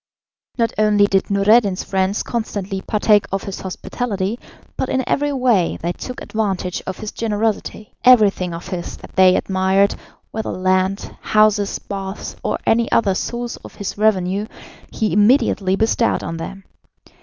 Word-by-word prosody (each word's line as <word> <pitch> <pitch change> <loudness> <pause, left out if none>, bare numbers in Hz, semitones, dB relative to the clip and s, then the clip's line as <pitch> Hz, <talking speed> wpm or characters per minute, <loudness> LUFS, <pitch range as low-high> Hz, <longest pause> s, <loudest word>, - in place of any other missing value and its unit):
Not 230 -2 +1
only 210 -1 +4
did 195 -1 +1
Noureddin's 200 0 +3
friends 190 +1 0
constantly 200 -4 -3
partake 210 0 +2
of 195 0 -2
his 195 - -6
hospitality, 200 +2 -3 0.4
but 260 - -2
in 260 -1 -1
every 290 0 +1
way 245 -10 +2
they 170 - -2
took 250 +7 -7
advantage 195 -4 -2
of 190 - -4
his 215 - -6
generosity; 215 -1 -2
everything 210 -7 +5
of 170 +1 -7
his 175 -2 -5
that - - -14
they 185 -1 +6
admired, 190 +1 +2 0.4
whether 220 0 -4
land, 185 +1 0
houses, 215 -1 +2
baths, 195 0 -6
or - - 0
any 230 0 +2
other 200 -4 +3
source 240 +5 -4
of - - -13
his 200 - -5
revenue, 205 -1 +1 0.4
he 215 -5 -1
immediately 205 -3 +3
bestowed 225 +2 +1
on 165 - -4
them. 195 +4 -7
205 Hz, 145 wpm, -19 LUFS, 190-220 Hz, 0.4 s, they